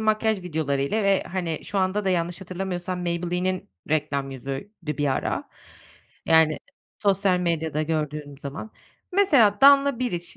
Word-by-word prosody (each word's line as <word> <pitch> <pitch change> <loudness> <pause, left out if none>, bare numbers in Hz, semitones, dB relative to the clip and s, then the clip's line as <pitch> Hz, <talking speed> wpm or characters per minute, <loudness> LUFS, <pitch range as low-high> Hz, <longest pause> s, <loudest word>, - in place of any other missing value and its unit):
makyaj 215 -2 +1
videolarıyla 155 +3 -1
ve, 195 -1 +3
hani, 175 -4 -4
şu 200 +2 -2
anda 190 +2 0
da 190 - +2
yanlış 175 0 -1
hatırlamıyorsam 185 -1 -4
Maybelline’nin 180 - -2 0.2
reklam 145 -3 -1
yüzüydü 135 +8 -6 0.3
bir 145 - +1
ara, 135 - -1 0.8
yani, 160 -1 +4 0.4
sosyal 195 -2 +2
medyada 160 -3 -1
gördüğüm 150 -2 -3
zaman. 145 +10 -7 0.4
Mesela 275 - +4
Danla 280 -2 +6
Biliç 175 -9 -3
180 Hz, 125 wpm, -25 LUFS, 155-200 Hz, 0.8 s, Danla